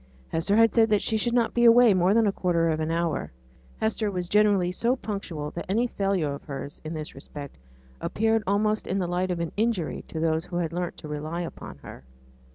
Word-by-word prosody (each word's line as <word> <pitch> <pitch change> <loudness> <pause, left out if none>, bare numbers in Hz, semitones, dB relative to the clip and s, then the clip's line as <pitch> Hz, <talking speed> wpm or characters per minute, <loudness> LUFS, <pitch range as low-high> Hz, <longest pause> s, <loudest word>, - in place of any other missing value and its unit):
Hester 165 +5 +1
had 225 0 +5
said 225 -1 +4
that 210 -1 +2
she 225 - 0
should 235 +2 +1
not 235 -2 +2
be 240 - +2
away 235 -1 +7
more 185 +2 +3
than 230 -1 +4
a 205 - +3
quarter 170 -3 +1
of 155 -1 0
an 155 0 -1
hour; 165 -1 0
and - - -16 0.5
Hester 220 -1 0
was 180 -3 -3
generally 200 -3 +3
so 235 +7 +1
punctual 190 - -5
that 170 - -6
any 225 +5 +2
failure 195 -10 -1
of 140 - -8
hers, 140 0 -6
in 160 +1 -5
this 155 -1 -6
respect, 140 - -9 0.4
appeared 225 +1 +1
almost 210 +2 +1
in 190 - -1
the 185 - 0
light 180 +1 -1
of 175 -1 -2
an 170 -1 -2
injury 215 -7 -1
on 160 - -1
those 160 +1 +1
who 180 -1 -8
had 170 -2 -1
learnt 175 0 -3
to 155 - -9
rely 155 +3 -4
upon 170 - -8
her. 65 - -10
180 Hz, 225 wpm, -26 LUFS, 165-215 Hz, 0.5 s, away